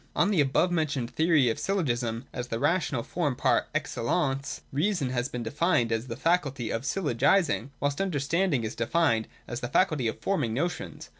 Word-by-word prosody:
On 180 Hz, +4 st, +3 dB
the 180 Hz, -7 st, +4 dB
above 145 Hz, +6 st, +2 dB
mentioned 145 Hz, -8 st, -1 dB
theory 160 Hz, -5 st, +3 dB
of -, -, -5 dB
syllogism, 120 Hz, -, -1 dB
as 125 Hz, -1 st, -4 dB
the 115 Hz, -, -2 dB
ra 145 Hz, +8 st, +3 dB
tional 130 Hz, -9 st, -3 dB
form 150 Hz, -7 st, -1 dB
par -, -, +2 dB
excellence, 135 Hz, +2 st, -1 dB
reason 150 Hz, -2 st, 0 dB
has 125 Hz, +1 st, -1 dB
been 125 Hz, -1 st, -4 dB
defined 125 Hz, -1 st, +1 dB
as 115 Hz, +2 st, -1 dB
the 115 Hz, -, -4 dB
faculty 140 Hz, -5 st, 0 dB
of 115 Hz, -, -1 dB
syllogising, 145 Hz, -, +1 dB
whilst 145 Hz, +4 st, -1 dB
understanding 165 Hz, -4 st, 0 dB
is 110 Hz, -, -3 dB
defined 115 Hz, -2 st, +1 dB, 0.2 s
as 120 Hz, -, -4 dB
the 120 Hz, -, -3 dB
faculty 150 Hz, -5 st, +2 dB
of 110 Hz, -, -2 dB
forming 120 Hz, -, 0 dB
notions. 175 Hz, +7 st, -3 dB
140 Hz, 175 wpm, -28 LUFS, 120-170 Hz, 0.2 s, the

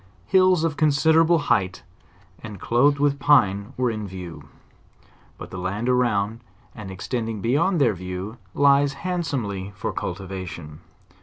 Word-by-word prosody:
Hills 185 Hz, -, +4 dB
of 160 Hz, -2 st, -1 dB
considerable 160 Hz, +3 st, +4 dB
height, 95 Hz, -, 0 dB, 0.6 s
and 105 Hz, -3 st, -9 dB
clothed 140 Hz, +9 st, +3 dB
with 140 Hz, 0 st, +1 dB
pine, 115 Hz, -7 st, +3 dB
were 125 Hz, -2 st, +1 dB
in 110 Hz, -2 st, -5 dB
vietv; 90 Hz, -3 st, -8 dB, 0.9 s
but -, -, -10 dB
the 95 Hz, -, -6 dB
land 100 Hz, +6 st, -3 dB
around, 115 Hz, -4 st, +1 dB, 0.3 s
and 105 Hz, -3 st, -9 dB
extending 110 Hz, +3 st, -4 dB
beyond 150 Hz, -, +1 dB
their 120 Hz, -6 st, +3 dB
view, 90 Hz, +5 st, -6 dB, 0.2 s
lies 140 Hz, 0 st, +4 dB
handsomely 135 Hz, -, -3 dB
for 100 Hz, -, -4 dB
cultivation. 90 Hz, -4 st, -6 dB
115 Hz, 130 wpm, -23 LUFS, 95-145 Hz, 0.9 s, Hills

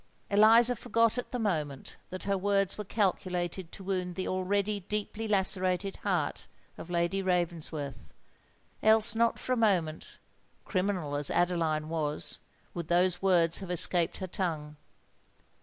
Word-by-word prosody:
Eliza 225 Hz, +4 st, +6 dB
forgot 230 Hz, +1 st, +1 dB
at 245 Hz, -, -6 dB
the 250 Hz, -, -4 dB
moment 155 Hz, -, -3 dB
that 185 Hz, +1 st, -7 dB
her 200 Hz, 0 st, 0 dB
words 195 Hz, 0 st, +1 dB
were 210 Hz, -, -5 dB
calculated 185 Hz, -4 st, -2 dB
to 195 Hz, -, -11 dB
wound 185 Hz, -2 st, -3 dB
the 185 Hz, -, -3 dB
already 200 Hz, +2 st, -1 dB
deeply 210 Hz, +3 st, -4 dB
lacerated 190 Hz, -1 st, +1 dB
heart 180 Hz, -8 st, -2 dB, 0.3 s
of -, -, -10 dB
Lady 175 Hz, +2 st, 0 dB
Ravensworth;—else 175 Hz, -, -1 dB
not 230 Hz, +1 st, +1 dB
for 255 Hz, -, -2 dB
a -, -, 0 dB
moment—criminal 185 Hz, -2 st, -2 dB
as 145 Hz, 0 st, 0 dB
Adeline 165 Hz, -3 st, 0 dB
was—would 160 Hz, +1 st, -5 dB
those 175 Hz, +1 st, +1 dB
words 170 Hz, -3 st, +4 dB
have 190 Hz, -, -8 dB
escaped 175 Hz, -1 st, +4 dB
her 190 Hz, -, -5 dB
tongue. 160 Hz, -5 st, -4 dB
185 Hz, 125 wpm, -29 LUFS, 170-205 Hz, 0.3 s, Eliza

